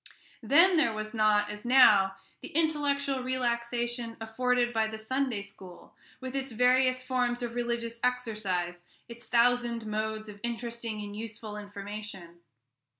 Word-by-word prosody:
Then 335 - +5
there 235 -9 +2
was 215 +1 -5
not, 210 -2 +3
as 210 0 -8
now, 215 -7 +6 0.3
the - - -7
intellectual 285 -4 +1
relaxation 240 -2 -2
afforded 240 +2 0
by 220 -1 +2
the 220 0 -6
Sunday 240 -1 -2
school, 190 -3 -13 0.2
with 260 0 -6
its 270 -1 -3
various 255 +2 +3
forms 250 -1 -1
of 235 -1 -4
religious 235 -1 -3
exercise, 210 -8 -1 0.3
its 235 0 -11
thousand 240 -1 +2
modes 215 0 -3
of 205 -1 -10
interesting 235 -2 -4
and 205 0 -7
useful 220 -1 -7
information. 205 -3 -8
235 Hz, 135 wpm, -29 LUFS, 215-250 Hz, 0.3 s, now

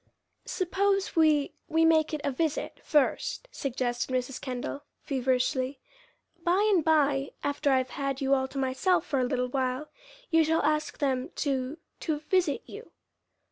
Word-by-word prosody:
"Suppose 390 0 0
we 310 -3 +3
we 325 +1 +3
make 320 -1 +4
it 305 -2 -3
a 280 - 0
visit, 310 +3 -2
first," 300 - +1
suggested 250 -2 -2
Mrs. 255 0 -2
Kendall, 255 +2 -4 0.2
feverishly. 260 0 0 0.6
"By 365 +5 +3
and 350 -5 +3
by, 285 -3 +2
after 285 0 0
I've 260 -1 +1
had 275 -1 -2
you 275 -1 +2
all 265 -1 +2
to 270 - -9
myself 295 +7 +1
for 285 -6 0
a - - +2
little 250 0 -1
while, 260 +2 -1 0.4
you 325 -1 +5
shall 320 +1 +1
ask 305 +1 0
them 265 -3 0
to 270 0 -1 0.2
to 310 -3 -1
visit 310 0 0
you." - - -10
285 Hz, 150 wpm, -28 LUFS, 260-320 Hz, 0.6 s, you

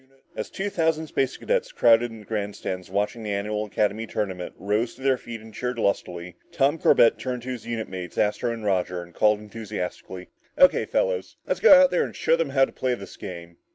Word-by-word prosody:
As 110 - -4
two 200 +1 -4
thousand 160 -2 +1
space 135 -4 -1
cadets, - - -1
crowded 120 - +4
in 115 -1 -11
the - - -15
grandstands 100 -4 -4
watching 105 +4 -1
the 110 - -5
annual 105 +1 -2
academy 105 +2 -1
tournament, 95 -5 -4
rose 105 +4 -1
to - - -16
their 135 -1 +4
feet 120 -3 -8
and 110 0 -13
cheered 125 +3 -3
lustily, 90 -4 -2
Tom 145 +4 +2
Corbett 115 - +5
turned 125 -2 -4
to 130 - -6
his 125 -3 -6
unit 115 -2 -3
mates 90 -1 -7
Astro 105 +3 +1
and 115 -2 -6
Roger 90 -2 0
and 85 0 -16
called 105 +2 +3
enthusiastically, 105 -4 -6 0.3
"O.K., 275 0 +5
fellas. - - -1
Let's - - -1
go 285 -11 +9
out 275 0 +5
there 180 - +2
and - - -6
show - - +2
them 165 -3 -1
how 135 -1 +4
to - - -13
play 130 -1 -1
this 100 -4 -10
game!" 85 -4 -9
110 Hz, 210 wpm, -25 LUFS, 100-130 Hz, 0.3 s, go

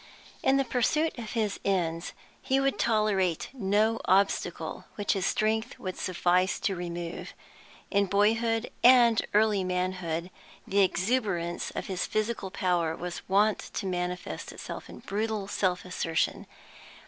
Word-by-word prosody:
In 270 +1 +3
the 275 - +2
pursuit 300 +7 +1
of 225 -2 -6
his 215 -4 -1
ends 170 -4 -1 0.3
he 265 0 +1
would 275 0 +1
tolerate 210 -6 +1
no 220 -1 +1
obstacle 185 -4 +1
which 205 - 0
his 195 -2 0
strength 220 +1 0
would 185 -1 -5
suffice 180 +1 +1
to 195 - 0
remove. 175 -1 -5 0.6
In 200 0 +3
boyhood 225 +4 +2
and 240 -3 +7
early 210 -2 +4
manhood 180 -2 -2 0.3
the 200 - +1
exuberance 190 -3 0
of - - -3
his 190 -1 -2
physical 215 -2 -1
power 175 -3 0
was 175 +1 -5
wont 205 +2 +3
to - - -5
manifest 180 -1 -3
itself - - -8
in - - -10
brutal 210 0 -2
self 185 -3 0
assertion. 165 -3 -1
195 Hz, 135 wpm, -28 LUFS, 180-220 Hz, 0.6 s, and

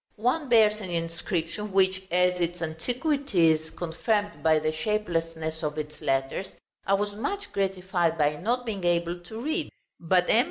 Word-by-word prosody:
One 255 +6 0
bears 215 -2 +5
an 190 - -6
inscription, 170 +4 -3
which, 190 0 +3
as 180 +1 +3
its 175 +1 -1
antiquity 220 - +1
is 160 0 -1
confirmed 205 +6 -1
by 160 -1 +4
the 155 0 0
shapelessness 165 -3 -2
of 150 -1 -2
its 150 0 -6
letters, 135 +8 -1 0.3
I 195 - +5
was 205 +1 -1
much 405 - -4
gratified 185 -4 0
by 150 -1 +2
not 240 +8 -1
being 205 -5 -4
able 175 0 +1
to 200 +6 -9
read; 310 +5 -1 0.3
but 180 +1 +2
M. 225 - +5
180 Hz, 160 wpm, -27 LUFS, 165-215 Hz, 0.3 s, bears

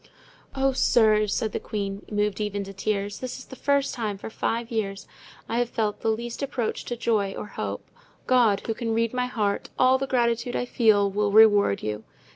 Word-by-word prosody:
"Oh, 270 0 +2
sirs," 215 -4 +3
said 220 +1 -1
the - - -3
queen, 200 -2 -4
moved 210 0 0
even 205 -1 -2
to 195 0 -9
tears, 200 +1 -2
"this 255 -1 -5
is 260 - -10
the - - -11
first 280 +1 +1
time 215 -5 -3
for 205 - -8
five 230 +2 -2
years 200 -3 -3 0.4
I 230 +1 -1
have 245 -1 0
felt 215 -4 -1
the 225 - -1
least 235 +3 -3
approach 260 -5 -2
to 240 - -4
joy 210 -4 0
or - - -5
hope. 105 - -5 0.4
God, 235 -6 +3
who 225 - -1
can 225 0 -2
read 230 0 0
my 250 0 0
heart, 210 -5 -1
all 260 +1 +4
the 270 - -2
gratitude 240 -1 0
I - - -1
feel, 215 -5 +3
will 205 +1 0
reward 205 - +5
you! 105 0 -3
220 Hz, 200 wpm, -25 LUFS, 205-240 Hz, 0.4 s, reward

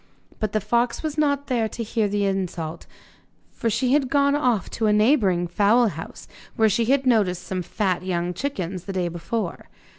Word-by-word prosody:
But 215 -2 -2
the 215 - +2
fox 235 +6 0
was 310 -2 -2
not 285 -2 +1
there 235 -4 0
to 230 - -5
hear 220 -1 0
this 205 0 -1
insult, 180 -5 -3 0.6
for 230 - -2
she 250 +4 +1
had 280 -3 +2
gone 280 0 +3
off 250 -9 +1
to 225 - 0
a - - +4
neighbouring 210 -5 +3
fowl 210 +6 +3
house, 165 -2 -9 0.3
where 220 -1 +4
she 230 +3 +1
had 270 +2 +2
noticed 200 -8 +2
some 185 -1 -3
fat 185 0 -1
young 175 -1 -1
chickens 185 -6 -4
the 195 - -5
day 180 -2 -1
before. 175 +3 -4
215 Hz, 185 wpm, -23 LUFS, 185-245 Hz, 0.6 s, a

